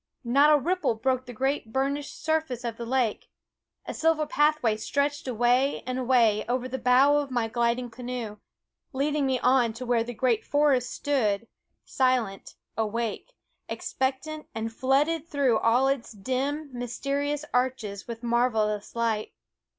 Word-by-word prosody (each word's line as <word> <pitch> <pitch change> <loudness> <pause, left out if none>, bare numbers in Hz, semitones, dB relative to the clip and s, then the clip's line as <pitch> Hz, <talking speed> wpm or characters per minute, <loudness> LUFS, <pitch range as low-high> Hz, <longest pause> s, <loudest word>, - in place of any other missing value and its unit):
Not 280 +5 +5
a 300 - +7
ripple 345 -3 0
broke 255 +3 -1
the - - -6
great 265 -1 -2
burnished 280 +3 -2
surface 315 -6 0
of 235 -2 -3
the 235 - -6
lake; 245 -4 0 0.6
a - - -5
silver 320 -1 +2
pathway 295 -7 +2
stretched 285 +5 -1
away 250 +3 +2
and 255 0 -2
away 235 -4 +3
over 250 +1 0
the 260 +1 -4
bow 260 +4 +5
of 290 -1 -1
my 240 -3 0
gliding 235 +1 0
canoe, 240 -3 -5 0.6
leading 285 +1 0
me 260 -1 +1
on 250 -3 +3
to 245 +3 -7
where 235 -2 +2
the 240 +1 -7
great 240 -2 +1
forest 285 -4 +2
stood, 230 -7 0 0.4
silent, 250 -7 0 0.2
awake, 225 - -3 0.3
expectant, 270 +4 -3
and 225 0 -3
flooded 290 +6 +1
through 275 -8 +2
all 245 +4 +3
its 270 -4 -1
dim, 270 +7 -2
mysterious 280 +4 -2
arches 245 -5 -1
with 230 0 -7
marvelous 225 -4 0
light. 225 -2 -1
255 Hz, 145 wpm, -27 LUFS, 230-280 Hz, 0.6 s, a